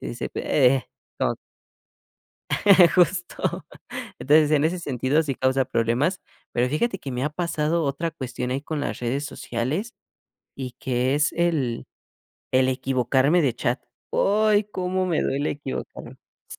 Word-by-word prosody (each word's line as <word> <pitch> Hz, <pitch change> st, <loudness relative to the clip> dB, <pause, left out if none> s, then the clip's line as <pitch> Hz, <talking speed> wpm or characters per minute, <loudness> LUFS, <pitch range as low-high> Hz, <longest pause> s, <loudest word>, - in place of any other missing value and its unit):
Y -, -, -6 dB
dice -, -, -4 dB
pe 135 Hz, -4 st, +2 dB
eh, 130 Hz, -, -6 dB, 0.3 s
co -, -, +1 dB, 1.6 s
Justo. 180 Hz, 0 st, +1 dB, 0.5 s
Entonces 150 Hz, +2 st, +4 dB
en 150 Hz, -1 st, +3 dB
ese 175 Hz, +3 st, +1 dB
sentido 140 Hz, 0 st, 0 dB
sí 140 Hz, -4 st, -2 dB
causa 130 Hz, +1 st, +1 dB
problemas, 120 Hz, -, 0 dB, 0.3 s
pero 120 Hz, +1 st, +1 dB
fíjate 190 Hz, -, 0 dB
que 135 Hz, -, -7 dB
me 125 Hz, +2 st, -2 dB
ha 150 Hz, -, 0 dB
pasado 165 Hz, 0 st, -1 dB
otra 145 Hz, +4 st, -1 dB
cuestión 125 Hz, -4 st, -5 dB
ahí 135 Hz, +2 st, -1 dB
con 155 Hz, -1 st, -3 dB
las -, -, -3 dB
redes 130 Hz, +4 st, -1 dB
sociales 145 Hz, -, -3 dB, 0.6 s
y 130 Hz, -2 st, -5 dB
que 130 Hz, +1 st, 0 dB
es 150 Hz, +1 st, +2 dB
el 155 Hz, -9 st, 0 dB, 0.7 s
el 130 Hz, 0 st, +4 dB
equivocarme 130 Hz, +4 st, +2 dB
de 130 Hz, -5 st, +1 dB
chat. 120 Hz, +2 st, -1 dB, 0.3 s
¡Ay! 210 Hz, +1 st, +3 dB
Cómo 185 Hz, -2 st, -2 dB
me 170 Hz, -4 st, +1 dB
duele 140 Hz, +2 st, 0 dB
equivocar 145 Hz, -2 st, -6 dB, 0.3 s
sí. -, -, -10 dB
145 Hz, 145 wpm, -24 LUFS, 130-170 Hz, 1.6 s, Entonces